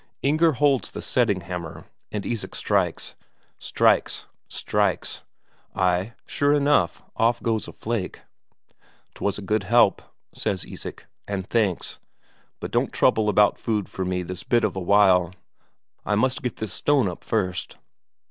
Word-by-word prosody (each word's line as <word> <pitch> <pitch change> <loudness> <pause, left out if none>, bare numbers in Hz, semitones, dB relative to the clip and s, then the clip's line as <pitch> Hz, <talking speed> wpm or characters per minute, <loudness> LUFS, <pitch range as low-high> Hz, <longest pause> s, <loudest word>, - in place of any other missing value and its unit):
Inger 155 +3 +3
holds 140 0 +2
the - - -7
setting 105 -7 +1
hammer, 85 -2 -6 0.3
and 105 -2 -4
Isak 115 -3 -4
strikes. - - 0 0.5
Strikes, - - +2 0.2
strikes. - - -1 0.5
Ay, 90 +4 +1
sure 145 0 +1
enough, 145 -11 +2
off 115 +1 +3
goes 110 -2 0
a - - -7
flake. 110 -5 -4 0.9
"'Twas 100 -1 -2
a 100 - -7
good 105 +2 +1
help," 110 +1 +4 0.3
says 95 -4 -2
Isak, - - -8 0.2
"and 100 -2 -3
thanks. 105 -5 -1 0.6
But - - -6
don't - - +1
trouble 110 -1 +3
about 105 0 +4
food 105 -3 -1
for 95 - -4
me 90 0 -1
this 90 +1 -6
bit 120 +5 +1
of 110 - 0
a - - -2
while, 90 -2 +4 0.7
I 105 - 0
must 130 +4 +1
get 125 -2 -3
this 110 -4 -5
stone 140 -1 +2
up 90 - -6
first." 90 -6 -2
105 Hz, 145 wpm, -24 LUFS, 95-120 Hz, 0.9 s, help